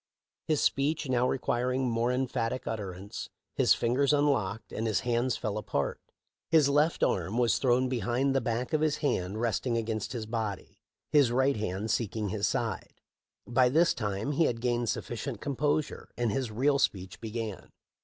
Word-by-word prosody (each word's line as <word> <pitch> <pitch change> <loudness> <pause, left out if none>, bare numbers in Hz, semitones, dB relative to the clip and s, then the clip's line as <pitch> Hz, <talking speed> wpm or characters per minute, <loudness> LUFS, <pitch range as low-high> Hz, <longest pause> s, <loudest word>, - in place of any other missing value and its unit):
His 155 -2 +2
speech 145 +2 +1
now 125 -1 +2
requiring 130 0 0
more 115 +1 +1
emphatic 125 -1 -1
utterance, 100 -3 -5 0.2
his - - +4
fingers 130 +5 +2
unlocked 135 -8 +1
and 115 - -2
'his 105 -4 +1
hands 120 +1 0
fell 105 0 -2
apart. 70 -8 -2 0.5
His 155 -4 +5
left 150 +3 +2
arm 95 +5 0
was 120 -2 +3
thrown 130 0 +3
behind, 125 +3 0
the 135 - +2
back 120 +5 -2
of 155 - +2
his 155 -1 +2
hand 95 -5 0
resting 120 +1 0
against 110 -1 -2
his 115 -3 -4
body, 110 -3 -4 0.3
his 145 -5 +5
right 130 +3 +3
hand 105 0 -2
seeking 110 -2 -1
his 100 0 0
side. - - -2 0.5
By 125 +1 +3
this 165 +6 +4
time 105 +3 -2
he 160 +3 +3
had 115 -4 0
gained 120 -1 0
sufficient 120 0 -4
composure, 145 +3 -1
and 120 -3 +1
his 130 +2 -1
real 140 +6 +2
speech 95 -7 -1
began. 110 -2 -5
120 Hz, 165 wpm, -29 LUFS, 110-135 Hz, 0.5 s, His